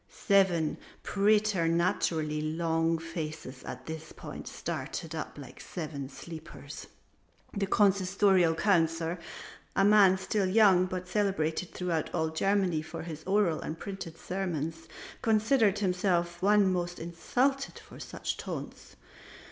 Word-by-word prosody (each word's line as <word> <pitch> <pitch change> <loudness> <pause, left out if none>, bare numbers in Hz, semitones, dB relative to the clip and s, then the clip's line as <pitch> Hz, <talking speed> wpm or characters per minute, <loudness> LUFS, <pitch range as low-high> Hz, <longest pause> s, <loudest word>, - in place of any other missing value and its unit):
Seven 190 -6 +3 0.3
preternaturally 170 -6 +1
long 165 +1 0
faces 160 -5 -6
at - - -7
this 160 0 -7
point - - -9
started 165 -1 -5
up 160 -2 -5
like 135 -4 -10
the - - -9
Seven 150 -6 -5
sleepers. 160 +2 -9 0.7
The 200 -1 0
Consistorial 190 -3 +3
Councillor, 165 -3 +2 0.6
a 195 - +4
man 200 -2 +6
still 190 +1 0
young 190 -2 +5
but 185 0 -5
celebrated 185 -4 0
throughout 170 -4 -2
all 160 -2 +1
Germany 185 0 +1
for 155 - -7
his 160 -2 -7
oral 190 -4 +2
and 160 - -5
printed 190 -4 -7
sermons, 165 -3 -3 0.3
considered 220 -1 +3
himself 180 -3 0
the 185 - -2
one 205 -2 +5
most 175 -1 -2
insulted 250 - -1
by - - -12
such - - -4
taunts. - - -7
175 Hz, 125 wpm, -30 LUFS, 160-195 Hz, 0.7 s, man